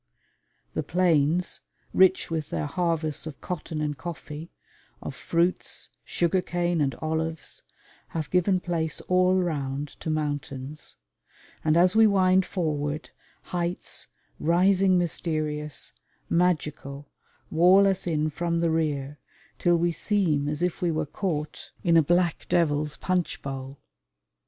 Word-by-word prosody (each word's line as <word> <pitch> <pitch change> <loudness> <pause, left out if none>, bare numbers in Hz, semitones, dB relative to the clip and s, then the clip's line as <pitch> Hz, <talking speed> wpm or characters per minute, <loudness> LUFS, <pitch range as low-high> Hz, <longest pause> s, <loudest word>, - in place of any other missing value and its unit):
The - - -1
plains, 175 -1 +1 0.3
rich 190 -2 +4
with 155 -2 -2
their - - -2
harvests 160 -1 -1
of 150 - -8
cotton 160 -3 -4
and 150 -1 -1
coffee, 160 0 -7 0.5
of - - -6
fruits, 170 +2 -1
sugar 175 +2 +1
cane 175 -2 0
and 135 -3 +1
olives, 160 0 -3 0.5
have 155 -3 -4
given 180 +1 +3
place 165 -3 -1
all 185 0 +3
round 145 -5 -1
to - - -4
mountains; 145 -2 -3 0.7
and 155 +1 +3
as 180 +3 +5
we 220 0 +7
wind 190 -2 +4
forward, 155 -4 -2 0.4
heights, 175 0 -1 0.3
rising 185 +3 +4
mysterious, 155 -4 -1 0.4
magical, 150 -5 0 0.4
wall 180 +5 +6
us 190 -2 0
in 155 -2 0
from 170 +2 -1
the 165 -1 +2
rear 150 -3 -1 0.4
till 175 -1 +4
we 170 +1 +2
seem 165 -7 +1
as 150 +3 -2
if 180 +1 -1
we 175 - +2
were 155 -1 0
caught 150 -1 -4
in 170 -2 +4
a 165 - +8
black 175 +2 +1
devil's 150 -3 +1
punch 180 -2 -1
bowl. 135 0 -6
165 Hz, 125 wpm, -26 LUFS, 150-180 Hz, 0.7 s, a